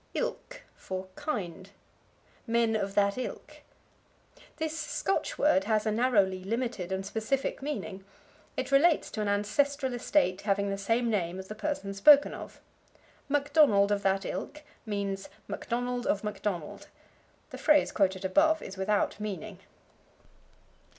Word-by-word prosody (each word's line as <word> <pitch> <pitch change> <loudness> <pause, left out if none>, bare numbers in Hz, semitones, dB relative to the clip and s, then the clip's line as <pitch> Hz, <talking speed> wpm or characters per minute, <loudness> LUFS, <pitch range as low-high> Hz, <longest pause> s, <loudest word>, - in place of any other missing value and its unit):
Ilk - - -4
for 185 0 -6
Kind. 195 - -4 0.8
"Men 230 -1 +2
of 200 -2 -2
that 200 +3 +2
ilk." 255 - -7 1.0
This 315 -1 -2
Scotch 310 +4 -2
word 195 -10 +3
has 215 -1 +1
a 215 - +1
narrowly 205 -5 +2
limited 230 -3 -3
and 190 0 -2
specific 220 +8 -2
meaning. 215 -9 -5 0.5
It - - -3
relates 300 +4 +4
to 215 - -3
an 210 - -1
ancestral 260 +7 +1
estate 245 -6 +1
having 200 -1 0
the 195 - -2
same 230 +3 +1
name 180 -4 -1
as 190 0 -8
the - - -4
person 215 -4 -3
spoken 280 +9 +6
of. - - -9 0.7
Macdonald 285 -8 +4
of 205 -1 +1
that 195 0 +1
ilk 300 0 -5 0.2
means, 200 -2 -3 0.2
Macdonald 245 +1 -3
of 200 - +1
Macdonald. 200 -6 -4 0.6
The - - -8
phrase 300 -1 +4
quoted 190 -1 +1
above 315 +11 +3
is 190 - -8
without 205 +2 0
meaning. 210 -1 -5
215 Hz, 135 wpm, -29 LUFS, 195-275 Hz, 1.0 s, spoken